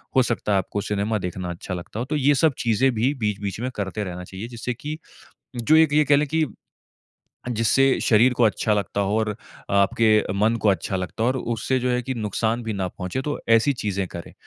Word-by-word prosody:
हो 130 - +6
सकता 115 -3 -2
है 100 - +4
आपको 95 +2 -2
सिनेमा 105 +2 -1
देखना 90 0 -4
अच्छा 85 +2 -6
लगता 90 +4 -6
हो। 120 - -2
तो 150 +4 -3
ये 145 0 +3
सब 150 +2 +3
चीज़ें 120 +3 +2
भी 120 +6 +1
बीच-बीच 105 -2 -2
में 125 +2 -2
करते 100 +1 -3
रहना 90 -2 -6
चाहिए, 95 +4 -8
जिससे 120 +1 -4
की 150 +6 -6 0.6
जो 120 +7 +3
एक 160 -2 +5
ये 150 +1 +4
कह 145 0 +4
लें 150 +1 +2
कि 160 +2 +1 1.1
जिससे 125 +4 +3
शरीर 120 +3 +4
को 125 - +1
अच्छा 110 0 +2
लगता 100 0 -1
हो 100 +2 0
और 110 -1 -1 0.3
आपके 105 +2 +3
मन 110 +3 +2
को 105 - +4
अच्छा 95 0 -1
लगता 90 +3 -3
हो - - +3
और 130 - -1
उससे 120 +2 -1
जो 125 0 -1
है 125 0 +1
कि 130 - -3
नुक़सान 115 +1 -1
भी 110 -1 -3
ना 95 -2 -2
पहुँचे, 90 +8 -4
तो 145 +2 -3
ऐसी 115 +5 +4
चीज़ें 100 -6 -2
करें। 85 -1 -9
110 Hz, 220 wpm, -23 LUFS, 100-130 Hz, 1.1 s, हो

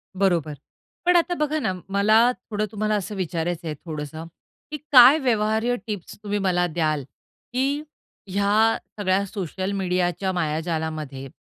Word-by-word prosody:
बरोबर. 175 -6 +1 0.5
पण 355 0 +4
आता 350 +1 +3
बघा 305 -2 0
ना 190 -10 -1 0.2
मला 215 +5 +4 0.2
थोडं 215 -1 -1
तुम्हाला 215 0 0
असं 205 +1 -3
विचारायचं 175 -2 -3
आहे 155 - -3
थोडंस 150 -3 -5 0.6
की, 305 - -3
"काय 260 +2 +9
व्यवहार्य 225 -2 +1
टिप्स 205 -5 -6
तुम्ही 205 0 -1
मला 180 -2 +1
द्याल 155 -3 -1 0.5
की 275 +4 0 0.5
ह्या 205 +3 +3 0.2
सगळ्या 195 0 +1
सोशल 190 -1 -4
मीडियाच्या 180 -1 0
मायाजालामध्ये 155 -4 -3
195 Hz, 130 wpm, -24 LUFS, 170-220 Hz, 0.6 s, काय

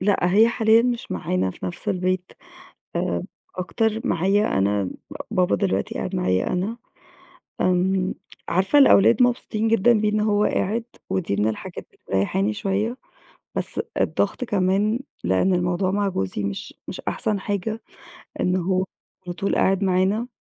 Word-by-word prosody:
لأ، 200 +1 +2 0.2
هي 225 +2 +6
حاليًا 225 0 +4
مش 240 -1 -2
معانا 90 +1 -1
في 95 - -7
نَفْس 90 - -5
البيت، 185 0 -1 0.6
آآ - - -1 0.3
أكتر 220 +4 -1
معايا 195 - +2
أنا، 100 -1 +1 0.4
بابا 180 0 +2
دلوقتي 195 -2 -1
قاعد 185 - -3
معايا 95 - +1
أنا. 200 +6 -1 0.8
آمم 185 +1 +1 0.3
عارفة 190 +11 +3
الأولاد 240 -2 +6
مبسوطين 235 -3 +1
جدًا 230 +1 +4
بيه 210 - +2
إن 210 0 0
هو 210 -1 +2
قاعد 225 +4 0 0.3
ودي 165 - -1
من 105 +2 +2
الحاجات 110 - -6
اللي - - -28 0.2
مريَّحاني 190 - +1
شوية، 210 +4 -1 0.6
بس - - 0 0.2
الضغط - - 0
كمان 205 +1 +1 0.2
لإن 95 - +2
الموضوع 180 +1 0
مع 205 0 +1
جوزي 95 - -2
مش 100 0 -4
مش - - -6
أحسن 210 -2 -1
حاجة 205 +3 -3 0.6
إن 180 +1 +2
هو 185 +1 +1 0.4
على 175 - -4
طول 195 - -1
قاعد 195 +1 +2
معانا. 190 +5 +1
190 Hz, 145 wpm, -23 LUFS, 180-215 Hz, 0.8 s, هي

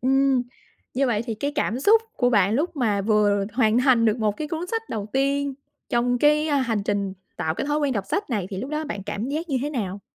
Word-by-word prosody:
Ừm. 270 0 +3 0.5
Như 270 +1 +2
vậy 220 -3 0
thì 225 - -2
cái 285 +7 -2
cảm 255 -4 -1
xúc 440 +8 +5
của 245 -1 +2
bạn 205 -2 +3
lúc 310 +4 -1
mà 215 -6 +1
vừa 205 -1 +2
hoàn 225 -1 +3
thành 250 -3 +4
được 220 +1 +2
một 210 -2 0
cái 305 -1 -4
cuốn 330 +2 -3
sách 450 +4 -2
đầu 210 -2 -4
tiên 275 +1 +1 0.3
trong, 245 +1 +1
cái, 300 +3 +3
ơ, 290 - +2
hành 230 -6 0
trình 200 -1 -1 0.2
tạo 160 0 -1
cái - - -3
thói 295 +1 +1
quen 285 -3 +1
đọc 200 -4 -2
sách 405 -6 -2
này 205 -6 -1
thì 190 - -4
lúc 260 +9 -5
đó 305 +1 -2
bạn 205 -9 -5
cảm 210 +6 -4
giác 315 +4 -3
như 270 - 0
thế 295 - -2
nào? 205 -7 -3
250 Hz, 250 wpm, -24 LUFS, 210-285 Hz, 0.5 s, xúc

